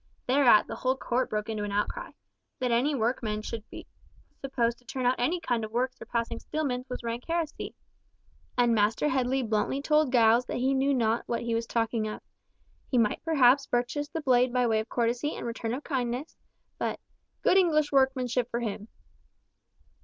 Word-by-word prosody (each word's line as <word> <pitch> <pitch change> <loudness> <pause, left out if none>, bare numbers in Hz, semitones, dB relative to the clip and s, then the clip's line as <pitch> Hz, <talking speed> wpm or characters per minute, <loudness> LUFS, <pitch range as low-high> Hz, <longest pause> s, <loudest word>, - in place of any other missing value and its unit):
Thereat 250 -4 +5
the - - -7
whole 260 +1 0
court 255 0 -1
broke 210 0 -2
into 215 -2 -3
an 205 - -3
outcry; 210 - -2 0.5
that 250 -2 -1
any 265 +6 +2
workman 220 -3 -1
should 225 0 -6
be - - -9 0.5
supposed 240 -3 -1
to 250 - -28
turn 255 +1 -4
out 250 - +4
any 310 +9 +1
kind 245 -9 -1
of 215 - -5
work 250 +3 0
surpassing 230 0 -3
Steelman's 265 -4 -3
was 250 - -5
rank 235 +1 -4
heresy, 330 -2 -3 0.8
and 240 -1 +4
Master 220 +7 +2
Headley 260 0 +1
bluntly 220 +4 0
told 300 -1 +2
Giles 235 0 +5
that - - -3
he 260 +2 +1
knew 270 +1 +2
not 230 -1 0
what 235 - -2
he 235 -1 -1
was 230 0 -1
talking 225 -2 0
of! 215 - -5 0.7
He 255 - +1
might 220 -3 +1
perhaps 275 -4 +4
purchase 255 +5 -1
the 325 - -4
blade 255 -3 +3
by 250 0 +2
way 220 -2 +2
of 220 - -5
courtesy 240 +5 0
and - - -6
return 230 -1 -3
of 260 +5 -4
kindness, 255 0 -3 0.4
but—good 375 - -2
English 305 -5 +2
workmanship 260 -3 +2
for 235 - -2
him! 210 -2 -4
245 Hz, 180 wpm, -28 LUFS, 230-270 Hz, 0.8 s, Thereat